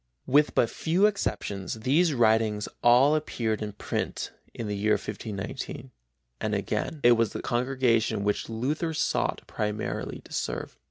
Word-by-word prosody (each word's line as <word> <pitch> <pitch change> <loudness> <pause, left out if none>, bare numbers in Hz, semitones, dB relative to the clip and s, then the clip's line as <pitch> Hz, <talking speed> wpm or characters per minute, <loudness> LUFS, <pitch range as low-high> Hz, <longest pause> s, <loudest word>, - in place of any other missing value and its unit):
With 145 +3 +3
but 115 - +4
few 175 - +1
exceptions 100 - -1
these 155 +8 +3
writings 110 -3 +3
all 125 +5 +6
appeared 115 -8 -1
in 105 -1 -4
print - - -3 0.2
in 115 - -5
the 105 - -2
year 105 +2 +2
1519, 110 +5 -5 0.5
and - - -1
again 155 - -2
it 120 - +7
was 115 -2 +3
the - - -4
congregation 120 -4 +1
which 105 +2 -1
Luther 150 +8 -1
sought - - 0
primarily 105 0 -3
to - - -14
serve. - - -3
115 Hz, 145 wpm, -27 LUFS, 105-140 Hz, 0.5 s, it